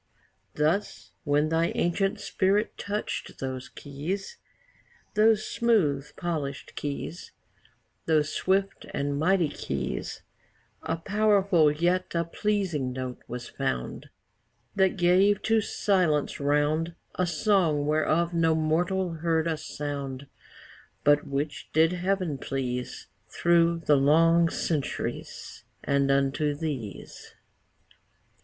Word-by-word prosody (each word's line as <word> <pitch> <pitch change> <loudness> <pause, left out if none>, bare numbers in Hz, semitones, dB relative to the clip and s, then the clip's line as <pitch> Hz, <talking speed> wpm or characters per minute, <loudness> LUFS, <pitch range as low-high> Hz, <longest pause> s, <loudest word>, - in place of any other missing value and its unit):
Thus, 160 +7 -1
when 145 +1 +2
thy 165 +1 +2
ancient 195 +3 0
spirit 200 +3 0
touch'd 205 +1 -4
those 130 -1 -5
keys, 170 - -5 0.7
Those 215 0 +4
smoothly 160 -13 +1
polished 155 -6 -4
keys, 145 +4 -5 0.7
Those 155 -2 +2
swift 195 +1 0
and 140 0 -1
mighty 180 +1 +3
keys 65 - -4 0.6
A 165 - -2
powerful 200 -4 +3
yet 175 +4 0
a 170 - +2
pleasing 170 -7 -1
note 130 -1 -5
was 120 0 -6
found 60 0 -4 0.7
That 190 0 +2
gave 185 +3 +4
to 225 0 +3
Silence 180 -8 +1
round 150 +4 +1 0.2
A 180 - 0
song 170 -4 +2
whereof 155 +3 +1
no 165 -1 +3
mortal 170 +3 0
heard 160 0 +1
a 165 -1 0
sound, 140 -3 -5 0.8
But 145 0 +4
which 140 +1 -3
did 160 +2 +4
Heaven 180 -5 -1
please 125 -2 -4 0.2
Through 170 -1 +2
the 145 - +5
long 165 +4 +4
centuries, 155 -4 -4 0.2
And 140 0 +1
unto 140 +2 +1
these. 140 -10 -6
160 Hz, 105 wpm, -27 LUFS, 145-185 Hz, 0.8 s, the